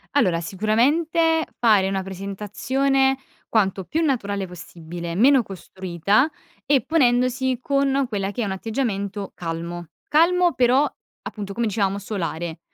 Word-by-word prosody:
Allora 180 -12 +3
sicuramente 300 - +2
fare 210 -5 +4
una 195 0 -1
presentazione 230 +8 0 0.3
quanto 195 -4 +1
più 325 +1 -1
naturale 205 -9 -1
possibile, 170 -1 -8
meno 260 +6 +5
costruita 190 - 0 0.4
e 275 -4 +3
ponendosi 255 -3 +2
con 275 -1 +1
quella 200 -2 -2
che 245 - -4
è 220 - 0
un 195 - -3
atteggiamento 200 -2 -3
calmo. 170 0 -5 0.2
Calmo 345 +3 +4
però 255 +3 +4 0.4
appunto 200 -2 -6
come 235 +1 0
dicevamo 200 -1 0
solare. 175 -5 -4
215 Hz, 120 wpm, -23 LUFS, 190-270 Hz, 0.4 s, meno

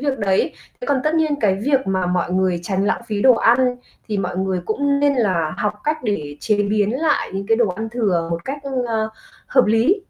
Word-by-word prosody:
việc 280 -2 -1
đấy. 195 -3 +1 0.3
Thế - - -6
còn 275 -2 +1
tất 305 +1 +1
nhiên 315 -2 +2
cái 195 -3 +3
việc 275 -4 +2
mà 190 -1 0
mọi 180 0 0
người 185 -2 +1
tránh 190 +1 -1
lãng - - 0
phí 210 -3 -2
đồ 260 -2 +7
ăn 245 +2 +3 0.3
thì 210 - -1
mọi 180 -2 -3
người 190 -1 -1
cũng 280 +5 +1
nên 285 -1 +3
là 185 -10 0
học 210 - 0
cách 305 +1 0
để 150 -9 -2
chế 210 -2 +1
biến 205 0 +1
lại 310 -3 +1
những 195 +1 -4
cái 225 +1 +3
đồ 235 -3 +2
ăn 220 +5 -4
thừa 195 -8 0
một 170 0 -3
cách, 275 +2 -4 0.3
ờ, 220 -1 -1 0.4
hợp 255 -1 +3
lý 225 - +3
215 Hz, 225 wpm, -20 LUFS, 190-265 Hz, 0.4 s, đồ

